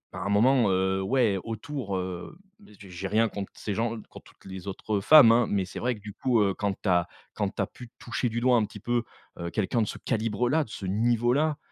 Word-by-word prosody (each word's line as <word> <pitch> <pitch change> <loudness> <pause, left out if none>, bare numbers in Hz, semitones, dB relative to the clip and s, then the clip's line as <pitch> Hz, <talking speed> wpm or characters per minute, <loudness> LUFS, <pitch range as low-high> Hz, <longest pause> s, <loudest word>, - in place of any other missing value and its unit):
à - - -5
un - - -1
moment, 115 +2 +4
heu, 95 +1 +1
ouais, 110 -1 +2
autour, 115 -2 -4
heu, 90 - -6 0.2
mais 205 - -18
j'ai 100 - -12
j'ai 90 +2 -5
rien 110 +2 +2
contre 100 -2 -6
ces 105 - -4
gens, 115 +1 -1 0.2
contre - - -14
toutes - - -26
les 95 0 -8
autres, 100 +2 -5
heu, - - -2
femmes, 145 0 +8
hein. 115 -1 +4
Mais 100 -2 0
c'est 90 - -8
vrai 125 0 0
que, 105 - -15
du 105 0 -9
coup, 125 +1 +1
heu, 100 -2 +2
quand 100 -2 -1
tu - - -5
as 90 -1 +3 0.3
quand - - -1
tu - - -14
as - - +1
pu 125 -1 -12
toucher 120 +1 -2
du 115 +1 -2
doigt 125 0 +4
un 110 - +2
petit 105 0 -11
peu, 120 +3 0 0.4
heu, 85 0 -4
quelqu'un 110 +4 0
de 110 - 0
ce - - -5
calibre-là, 120 +6 0
de - - -19
ce 100 - -7
niveau-là. 120 +8 +1
110 Hz, 250 wpm, -27 LUFS, 100-120 Hz, 0.4 s, femmes